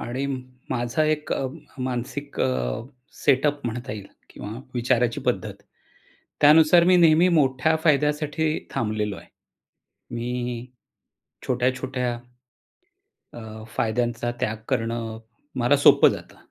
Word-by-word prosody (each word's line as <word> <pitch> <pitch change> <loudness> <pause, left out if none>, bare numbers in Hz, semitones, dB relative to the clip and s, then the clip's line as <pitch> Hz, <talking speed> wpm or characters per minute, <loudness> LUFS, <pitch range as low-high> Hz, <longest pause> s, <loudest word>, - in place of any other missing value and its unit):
आणि 125 +4 -3 0.4
माझा 120 +5 0
एक 155 0 -1 0.5
मानसिक 130 +3 -4
अ, 65 - -1 0.4
सेटअप 145 0 +2
म्हणता 120 +3 -4
येईल 105 -2 -7 0.2
किंवा 110 +5 -8
विचाराची 120 -1 +1
पद्धत, - - -2 0.9
त्यानुसार 160 +3 +7
मी 180 0 +5
नेहमी 165 +1 +5
मोठ्या 135 +3 +2
फायद्यासाठी 150 +1 +1 0.2
थांबलेलो 105 -3 -2
आहे. - - -14 0.8
मी 120 0 -3 0.8
छोट्या-छोट्या, 125 0 -1 1.2
अ, 110 -1 -9
फायद्यांचा 120 +1 0
त्याग 110 +1 -1
करणं 115 0 -2 0.4
मला 125 +4 +4
सोपं 140 - +7
जातं. - - -8
125 Hz, 100 wpm, -24 LUFS, 115-145 Hz, 1.2 s, त्यानुसार